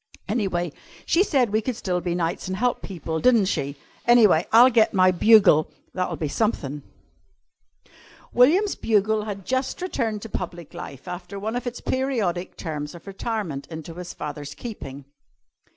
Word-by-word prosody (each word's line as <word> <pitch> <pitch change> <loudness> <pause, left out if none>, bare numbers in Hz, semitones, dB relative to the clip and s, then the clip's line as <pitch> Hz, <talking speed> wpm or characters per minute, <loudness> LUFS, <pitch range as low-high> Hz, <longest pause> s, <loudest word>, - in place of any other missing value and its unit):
Anyway 190 -6 -1 0.3
she 335 - +3
said 260 - +1
we 215 +1 +2
could 250 +2 -3
still 180 -4 -2
be 175 -1 -2
knights 175 +2 -2
an' 190 - -2
help 245 +4 0
people, 165 -4 -4
di'n't 230 -1 +4
she? 140 -6 -2 0.3
Anyway, 215 -9 +5
I'll 245 +3 +8
get 225 -2 +3
my 185 -1 +5
bugle. 185 -4 +5 0.2
That'll 180 -2 -2
be 155 - -3
something." 150 - -1 1.5
William's 345 - +4
bugle 215 0 +1
had 200 -3 -6
just 260 +1 -1
returned 230 - -2
to - - -6
public 175 -5 -6
life 135 +4 -9
after 180 +2 -6
one 215 +4 -3
of 245 0 -3
its 245 - -5
periodic 225 -10 -1
terms 150 -2 -5
of 170 - -13
retirement 195 -7 -4
into 160 0 -8
his 175 +1 -7
father's 145 -1 -6
keeping. 140 - -8
195 Hz, 155 wpm, -24 LUFS, 170-230 Hz, 1.5 s, I'll